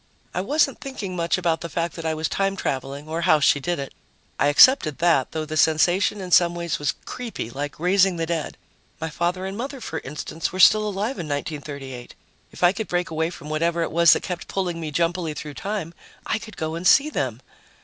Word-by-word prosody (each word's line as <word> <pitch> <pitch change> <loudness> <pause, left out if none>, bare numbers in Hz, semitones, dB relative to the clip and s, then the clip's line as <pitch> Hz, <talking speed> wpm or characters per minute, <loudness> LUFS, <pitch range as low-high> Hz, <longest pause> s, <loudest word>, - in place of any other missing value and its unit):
I 180 - -1
wasn't 285 +6 +1
thinking 245 -10 -5
much 170 0 0
about 170 -3 0
the 170 - -5
fact 165 +2 -2
that 165 -1 -4
I 160 - 0
was 155 0 -1
time 195 0 0
traveling 140 -2 -4
or 165 +2 -3
how 155 -2 +4
she 145 0 +4
did 175 +5 -2
it; 140 -1 -6 0.5
I 145 - +3
accepted 155 - +6
that, 165 -7 +2
though 160 -1 -3
the 155 0 -5
sensation 175 +6 +3
in 180 -1 -7
some 175 0 +5
ways 170 -2 -2
was 145 -3 -1
creepy, 230 - -6
like 145 +3 -5
raising 185 +2 +3
the 165 -1 -2
dead. 165 -2 -3 0.4
My 160 -1 -4
father 180 +3 -1
and 190 +1 -4
mother, 265 +5 -5
for 160 -9 -5
instance, 150 +3 -5
were 185 - -6
still 215 +3 +6
alive 205 +4 -2
in 165 - -4
1938. 140 -3 -5 0.4
If - - -8
I 175 - +7
could 220 0 -4
break 175 -1 -1
away 160 +1 0
from 150 -3 -9
whatever 165 +2 +1
it - - -3
was 170 +1 +6
that - - -2
kept 180 -2 -5
pulling 180 -3 -2
me 160 - -4
jumpily 165 0 -1
through 150 -1 -7
time, 195 -2 -4 0.3
I - - -1
could 215 0 -11
go 160 -1 -3
and 170 +2 -1
see 295 +9 +5
them. 125 - -2
170 Hz, 220 wpm, -23 LUFS, 155-185 Hz, 0.5 s, I